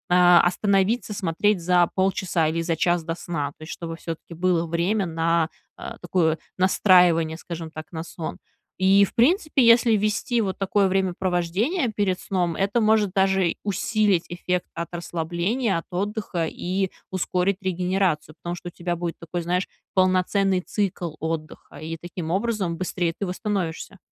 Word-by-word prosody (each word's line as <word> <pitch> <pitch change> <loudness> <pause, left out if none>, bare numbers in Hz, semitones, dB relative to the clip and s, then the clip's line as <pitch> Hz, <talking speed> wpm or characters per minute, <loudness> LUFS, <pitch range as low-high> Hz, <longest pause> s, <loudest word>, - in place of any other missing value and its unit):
остановиться 190 +5 +4
смотреть 195 +2 +1
за 175 0 +3
полчаса 185 -3 +1
или 165 +2 -1
за 165 -1 -1
час 175 0 +1
до 165 +1 -3
сна. 155 -5 -3
То - - -12
есть 155 - -8
чтобы 165 -1 -6
всё-таки 165 0 -7
было 170 0 +1
время 175 +5 0
на, 165 0 +1 0.3
э, - - -7
такое 165 -2 +1 0.2
настраивание, 180 -4 +4
скажем 170 -2 -7
так, 155 0 -9
на 160 -2 -5
сон. 165 -1 -6 0.4
И, 195 +1 +5
в - - -12
принципе, 305 - +3
если 230 -1 +6
ввести 215 +3 0
вот 190 -3 -2
такое 195 0 +2
времяпровождение 190 - 0
перед 190 -3 0
сном, 175 -4 -1
это 200 +6 +1
может 215 -3 +3
даже 190 -3 +2
усилить 205 -2 +1
эффект 175 +1 -2
от 170 0 -4
расслабления, 175 +6 -1
от 165 - -5
отдыха 195 -2 -2
и 190 +2 -2 0.2
ускорить 185 +1 0
регенерацию, 180 -4 0
потому 175 0 -3
что 175 - -8
у - - -16
тебя 175 0 -3
будет 170 -1 -4
такой, 170 +1 -4
знаешь, 180 +2 0 0.3
полноценный 185 0 +2
цикл 185 -5 -2
отдыха, 160 -1 -5
и 160 +2 -6
таким 170 -1 -6
образом 195 -3 -1
быстрее 175 -1 -2
ты 200 - -3
восстановишься. 185 -1 -3
180 Hz, 150 wpm, -24 LUFS, 170-195 Hz, 0.4 s, если